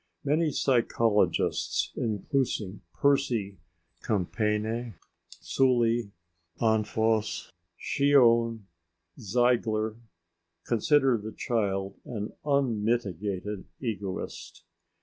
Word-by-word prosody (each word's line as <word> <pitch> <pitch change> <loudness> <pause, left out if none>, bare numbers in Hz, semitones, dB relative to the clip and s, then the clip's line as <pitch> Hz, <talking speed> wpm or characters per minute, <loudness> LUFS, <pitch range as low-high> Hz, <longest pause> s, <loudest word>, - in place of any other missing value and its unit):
Many 155 +3 +2
psychologists, 115 -6 +1
including 110 -2 -2
Percy, 120 -9 +1 0.4
Compayné, 110 +2 -1 0.4
Sully, 120 -4 +2 0.5
Anfosse, 110 0 +1 0.3
Schion, 115 -5 +3 0.6
Ziegler, 110 -1 +1 0.7
consider 130 +1 +3
the 110 +1 -7
child 100 -4 -2
an 105 -3 -5
unmitigated 105 - -1
egoist. 105 -6 -5
115 Hz, 60 wpm, -28 LUFS, 105-125 Hz, 0.7 s, Schion